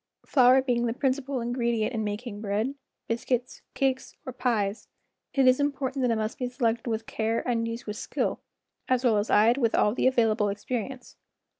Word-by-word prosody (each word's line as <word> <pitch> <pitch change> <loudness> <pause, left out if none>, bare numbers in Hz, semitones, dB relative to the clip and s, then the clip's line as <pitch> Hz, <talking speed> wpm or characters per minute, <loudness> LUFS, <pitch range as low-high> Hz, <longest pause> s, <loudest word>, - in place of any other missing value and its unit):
Flour 260 -1 +5
being 240 -2 +1
the 230 - -1
principal 265 -1 -1
ingredient 235 -1 -1
in 220 -2 -1
making 210 0 -5
bread, 215 +5 -1 0.3
biscuits, 245 +2 -2
cakes, 265 -1 -1
or 255 - -5
pies, 225 -5 -1 0.5
it 270 -2 +4
is 255 +1 +5
important 275 -2 -1
that 250 - +2
it 230 - +2
must 215 0 -3
be 250 -1 -2
selected 235 -2 -1
with 225 0 -2
care 225 +2 -2
and 230 -2 0
used 230 +1 -5
with 210 0 -5
skill - - -2 0.5
as 255 0 +2
well 225 -3 +4
as 205 - -2
eyed 230 +5 +4
with 230 -4 +2
all 210 - +3
the 255 - +2
available 225 -5 +2
experience. 245 +5 -5
240 Hz, 180 wpm, -27 LUFS, 220-255 Hz, 0.5 s, Flour